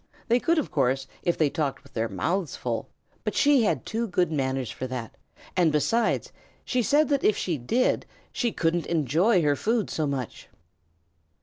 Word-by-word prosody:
They 240 +2 +4
could, 335 +6 +2
of 310 - -1
course, 135 -1 +1 0.2
if 175 - 0
they 150 -3 +2
talked 145 -5 -2
with 140 - -19
their 115 0 -1
mouths 180 -2 -1
full, - - -3 0.3
but - - -2
she 285 -3 +5
had 165 - 0
too 230 +1 -2
good 180 -3 +1
manners 130 -4 -1
for 130 - -5
that, 125 -3 -5 0.4
and, 175 -4 +4
besides, 215 +10 +1 0.3
she 250 - +1
said 290 +5 +3
that 280 -2 +1
if 210 - +3
she 165 -6 -1
did, 235 - +1 0.2
she 240 -2 0
couldn't 170 -2 0
enjoy 170 - +2
her 145 -1 +3
food 225 +5 0
so 155 -2 -1
much. 135 -4 -5
165 Hz, 180 wpm, -26 LUFS, 140-230 Hz, 0.4 s, she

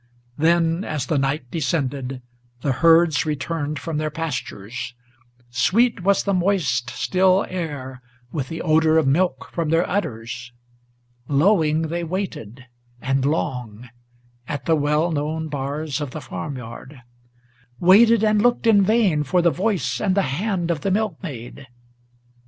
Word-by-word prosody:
Then, 165 +2 +2
as 150 -8 -3
the 145 +2 0
night 135 -2 -2
descended, 135 -5 -2 0.4
the 140 - 0
herds 165 +2 +4
returned 150 0 -3
from 150 +2 -3
their 155 0 -1
pastures; 125 -6 -5 0.6
Sweet 225 - +2
was 195 +2 +2
the 200 - 0
moist 170 -10 +1
still 185 +4 +2
air 145 -8 -5 0.3
with 135 -5 -3
the 165 - -5
odor 160 0 +3
of 160 - +3
milk 160 +3 0
from 165 -3 -1
their 165 +2 +2
udders; 120 - -4 0.7
Lowing 160 +1 +3
they 170 +2 -3
waited, 155 - -5 0.3
and 135 +1 0
long, 125 -6 -3 0.6
at 145 -4 -4
the 165 - +3
well 150 +3 +1
known 155 +1 -2
bars 145 +1 -3
of 145 - -3
the 155 - -7
farm 140 +1 -6
yard, 125 +2 -10 0.8
Waited 220 +5 +6
and 215 -1 +3
looked 240 +1 +2
in 215 -3 +6
vain 200 -6 +3
for 170 +5 +1
the 170 - +4
voice 155 - -1
and 190 -2 +1
the 200 - +3
hand 185 0 -1
of 155 -3 -2
the 195 - -1
milkmaid. 165 - -4
155 Hz, 140 wpm, -22 LUFS, 135-180 Hz, 0.8 s, Waited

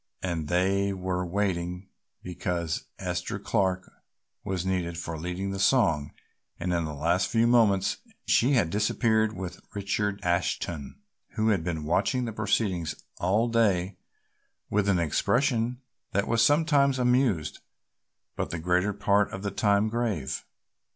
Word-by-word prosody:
And 85 -4 -2
they 95 +3 +1
were 90 -1 -2
waiting 90 -1 -2 0.4
because 90 -2 -3
Esther 90 0 -3
Clark 95 -2 0 0.6
was 95 -1 -2
needed 90 -3 -1
for 80 0 -4
leading 90 +4 -4
the 95 - -4
song 80 - +3 0.5
and 90 +1 -1
in 85 -1 0
the 75 -1 -5
last 85 +6 +1
few 115 0 +2
moments 110 -5 +3 0.3
she 130 +5 +3
had 105 -11 +2
disappeared 110 +1 +2
with 90 -1 -6
Richard 100 0 -1
Ashton, 85 -4 -1 0.4
who 110 0 +1
had 100 -6 +1
been 80 -3 -3
watching 125 - +1
the 115 - -4
proceedings 95 -6 0 0.2
all 105 +6 +2
day 100 -5 +1 0.8
with 100 -1 +2
an 95 - +3
expression 120 - +1 0.3
that 100 +1 +1
was 115 0 +3
sometimes 145 -1 +3
amused 125 - +1 0.8
but - - -2
the 85 - -3
greater 90 +4 +1
part 100 0 +2
of 95 - -6
the 100 - -2
time 100 +1 +2
grave. 110 - -2
95 Hz, 135 wpm, -27 LUFS, 90-110 Hz, 0.8 s, song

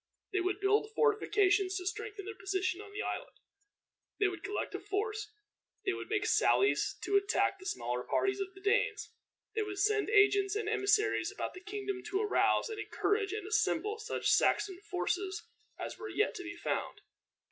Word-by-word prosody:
They 385 - +2
would 370 +2 -1
build 420 +2 +2
fortifications 410 -3 +3
to 365 - -5
strengthen 415 +1 -4
their 435 - -5
position 380 -1 -2
on 415 -1 -11
the 415 +1 -4
island. - - -4 0.8
They 410 - +4
would 365 -3 -7
collect 395 +1 -3
a 390 - -3
force. 420 +2 -3 0.5
They 385 - +2
would - - -6
make 420 0 0
sallies 410 -2 +3
to 400 - +3
attack 400 0 +1
the 375 - -8
smaller 125 +1 -2
parties 390 - 0
of 390 - -1
the 385 - -13
Danes. 400 0 +1 0.4
They 435 - 0
would 410 -2 -4
send 425 +1 +2
agents 405 -1 +4
and 425 -1 -2
emissaries 425 0 +2
about - - -4
the 365 - -10
kingdom 400 -1 -4
to 390 - 0
arouse, 420 - +3
and 440 -1 -6
encourage, 410 -1 0
and 425 -2 -4
assemble 425 +1 +1
such 435 +1 0
Saxon 380 -2 +2
forces 375 +2 -1 0.3
as - - -6
were 440 - -6
yet 420 - +1
to 370 - -6
be 340 0 -6
found. 340 - -3
400 Hz, 180 wpm, -32 LUFS, 385-425 Hz, 0.8 s, They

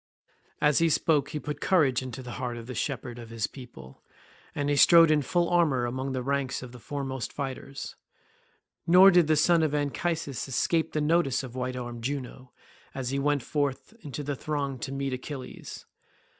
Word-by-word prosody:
As 150 -1 +3
he 165 0 +3
spoke 150 -2 +2
he 150 - -4
put 150 0 -6
courage 145 -10 +3
into 130 0 -7
the 125 - -8
heart 120 -2 -3
of 115 - -8
the 125 - -6
shepherd 125 -1 -4
of 115 -1 -10
his 115 -2 -2
people, 110 - -11 0.5
and 145 0 -1
he 145 - +2
strode 165 +2 +7
in 150 -1 +3
full 175 +5 +1
armour 155 -8 +2
among 130 +3 -3
the 130 -1 -2
ranks 140 -1 -1
of 125 - -9
the 125 - -12
foremost 135 -1 -4
fighters. 140 0 -6 0.9
Nor 185 +3 +8
did 175 -3 +5
the 155 - +4
son 165 +2 +4
of 155 -2 +1
Anchises 145 -1 -2
escape 160 +5 0
the 155 - 0
notice 150 -3 +2
of 125 -3 -8
white 130 0 -3
armed 120 -2 -6
Juno, 130 -1 -5 0.4
as 130 -2 -3
he 140 - 0
went 145 -2 +1
forth 145 +5 -2
into 145 -1 -6
the 145 0 -3
throng 140 -2 -3
to 130 - -5
meet 135 -1 -2
Achilles. 130 0 -7
140 Hz, 185 wpm, -28 LUFS, 125-150 Hz, 0.9 s, Nor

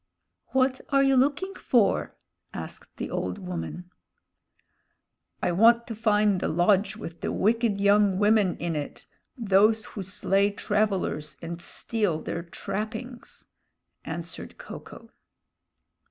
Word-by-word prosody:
"What 260 0 +1
are 275 -1 +4
you 270 0 +4
looking 290 +9 +1
for?" 230 - +1 0.4
asked - - -8
the - - -4
old 90 0 -2
woman. 90 - -6 1.5
"I - - +2
want 230 +6 +5
to 230 - -5
find 210 -3 +2
the - - -1
lodge 195 +5 +2
with 170 -6 -8
the - - -2
wicked 225 0 +1
young 200 -1 +4
women 205 -2 +3
in 170 -1 -2
it, 145 -1 -5 0.3
those 215 0 +3
who 205 - -5
slay 195 +1 +1
travelers 200 -7 -1
and 170 +1 -6
steal 205 -3 -1
their 170 - -4
trappings," 230 - -6 0.6
answered - - -7
Ko - - -8
ko. - - -14
205 Hz, 125 wpm, -26 LUFS, 180-230 Hz, 1.5 s, want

